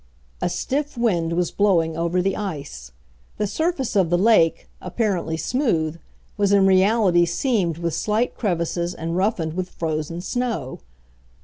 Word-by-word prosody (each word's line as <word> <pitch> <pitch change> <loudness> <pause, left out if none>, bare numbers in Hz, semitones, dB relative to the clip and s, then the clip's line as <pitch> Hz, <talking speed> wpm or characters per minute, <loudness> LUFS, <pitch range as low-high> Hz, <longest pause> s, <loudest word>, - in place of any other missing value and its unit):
A - - +1
stiff 285 0 -2
wind 175 -8 +1
was 175 0 0
blowing 170 -6 +2
over 170 +2 0
the 195 0 0
ice. 145 - -6 0.5
The 210 - 0
surface 280 - -1
of 190 -5 +3
the 175 - +3
lake, 190 -5 +3
apparently 185 -4 -1
smooth, 165 - 0 0.4
was 200 -1 +2
in 200 -1 +5
reality 190 -1 +4
seamed 175 - 0
with 170 -1 -2
slight 220 +3 0
crevices 175 -3 -1
and 165 +1 -4
rough 200 +5 +1
ened 160 -2 -3
with 185 +1 -3
frozen 160 0 -3
snow. 235 - -3
180 Hz, 145 wpm, -22 LUFS, 165-215 Hz, 0.5 s, in